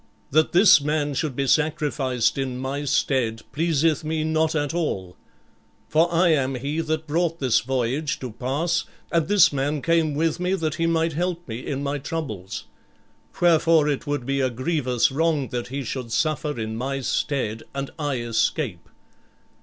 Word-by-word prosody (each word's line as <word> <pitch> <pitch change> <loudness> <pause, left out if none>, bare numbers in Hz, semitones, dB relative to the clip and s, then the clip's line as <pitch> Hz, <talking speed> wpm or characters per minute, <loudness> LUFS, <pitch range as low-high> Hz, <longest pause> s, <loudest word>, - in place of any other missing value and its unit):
That 155 +3 +3
this 180 -4 +7
man 150 0 0
should 140 -1 -2
be 140 - 0
sacrificed 140 -4 +1
in 130 -2 -2
my 135 +3 -3
stead 120 -5 0
pleaseth 160 0 +1
me 155 0 -1
not 160 0 +1
at 145 0 -1
all. 95 - -2 0.7
For 165 +2 +3
I 175 +1 +4
am 135 -4 +2
he 140 +5 -3
that 160 0 -2
brought 165 +2 0
this 130 -4 +3
voyage 130 +4 -1
to 125 -3 -5
pass; 145 +9 -1 0.3
and 165 -2 +1
this 205 -6 +5
man 145 +2 -1
came 160 -1 +1
with 165 +2 0
me 180 +1 +1
that 160 -5 -1
he 165 - +3
might 165 -1 +1
help 175 +2 -2
me 115 +1 -6
in 140 -1 -3
my 145 +1 -2
troubles. 110 - -5 0.7
Wherefore 165 -2 +4
it 145 -2 -2
would 145 -4 -2
be 135 +1 0
a 130 - +2
grievous 130 -1 0
wrong 150 -1 +1
that 120 -1 -3
he 135 +2 -4
should 125 -1 -5
suffer 150 +1 0
in 110 0 -3
my 135 +3 -3
stead 125 -5 -1
and 135 0 -3
I 145 -3 -1
escape. 115 - -1
145 Hz, 170 wpm, -24 LUFS, 130-160 Hz, 0.7 s, this